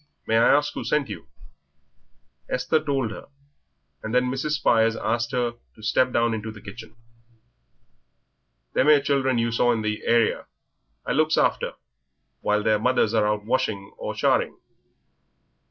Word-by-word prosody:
May 110 - 0
I 115 - +5
ask 145 +1 +1
who - - -5
sent 150 -2 0
you?" - - -8 1.2
Esther 155 +4 0
told 135 -6 -1
her, - - -9 0.7
and 110 +2 -4
then 125 0 +2
Mrs. 135 +3 -2
Spires 115 -6 +2
asked 115 +2 -1
her 120 -2 -1 0.2
to 110 - -16
step 130 +4 +2
down 115 -1 +1
into 110 0 -4
the 110 -1 -10
kitchen. 110 +3 -11 1.8
"Them 130 - +2
'ere 150 -2 +6
children 135 -3 +1
you 115 0 0
saw 120 +1 +2
in 115 -2 -1
the 105 0 -2
area 115 -1 +1 0.6
I - - -2
looks - - +2
after - - +1 0.7
while 105 0 0
their 110 0 +2
mothers 115 -1 +1
are 110 -2 +2
out 105 0 -1
washing 110 -5 -2
or - - -5
charing. - - +1
115 Hz, 155 wpm, -24 LUFS, 110-130 Hz, 1.8 s, ere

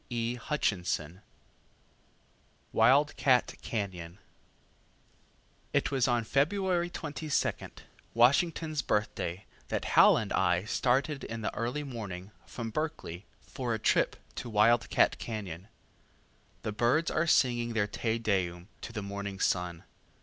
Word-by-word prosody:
Wild 145 +3 +4
cat 125 -3 +3
Cañon 95 -5 -4 1.6
It - - +1
was 135 -4 +2
on 120 -2 +2
February 175 - +1
22, 155 -3 -2 0.5
Washington's 155 +5 +3
Birthday, 105 -6 -2 0.2
that - - -2
Hal - - +7
and 110 -3 -3
I 90 -1 +2
started 135 +6 0
in 115 0 -5
the - - -2
early 125 +5 -2
morning 105 -8 -7 0.2
from 115 -2 -5
Berkeley, 110 - -4
for 120 -3 -3
a - - -2
trip - - +2 0.2
to 120 - -5
Wild 110 +2 +3
cat - - +3
Cañon. 100 -5 -6 1.0
The - - -2
birds 120 +10 +2
are 160 +2 +1
singing 120 -5 +2
their 110 -2 +2
Te 110 +2 -2
Deum 95 -5 -1
to - - -7
the 105 - -5
morning 100 0 -5
sun. 90 -3 0
115 Hz, 115 wpm, -30 LUFS, 100-140 Hz, 1.6 s, Hal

